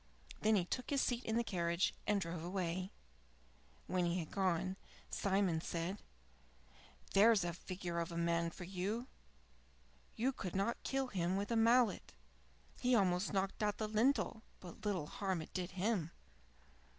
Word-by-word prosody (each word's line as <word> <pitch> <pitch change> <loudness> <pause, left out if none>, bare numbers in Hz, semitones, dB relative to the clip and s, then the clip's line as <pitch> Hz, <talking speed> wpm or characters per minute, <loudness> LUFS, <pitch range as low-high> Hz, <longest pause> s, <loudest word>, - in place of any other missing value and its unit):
Then 220 0 +4
he 185 -4 +2
took 250 +7 -3
his 280 - +2
seat 245 -1 0
in 220 - 0
the 235 - +2
carriage 170 -4 +1
and 210 -1 +3
drove 170 -2 -4
away. 180 0 -2 1.0
When 180 -1 +1
he 170 +1 +1
had 165 -4 -4
gone, 185 -1 +1 0.4
Simon 190 -4 +1
said: 170 +5 -3 1.1
"There's 210 -1 +6
a 175 -1 -1
figure 175 0 -4
of 170 0 -2
a 170 - -4
man 170 0 +1
for 180 - -9
you! 195 +6 -2 1.1
You 250 +4 +1
could 190 -8 -5
not 200 +5 0
kill 270 -1 -1
him 185 -3 0
with 200 +3 -2
a - - +2
mallet. 230 0 +3 0.7
He 250 0 +3
almost 185 -2 +2
knocked 195 +1 -1
out 210 -1 +1
the 215 - -1
lintel, 220 +1 +2 0.2
but 175 -3 -11
little 185 -7 0
harm 190 +2 -2
it 155 - -8
did 180 -1 -2
him." 190 -3 0
190 Hz, 160 wpm, -37 LUFS, 175-215 Hz, 1.1 s, There's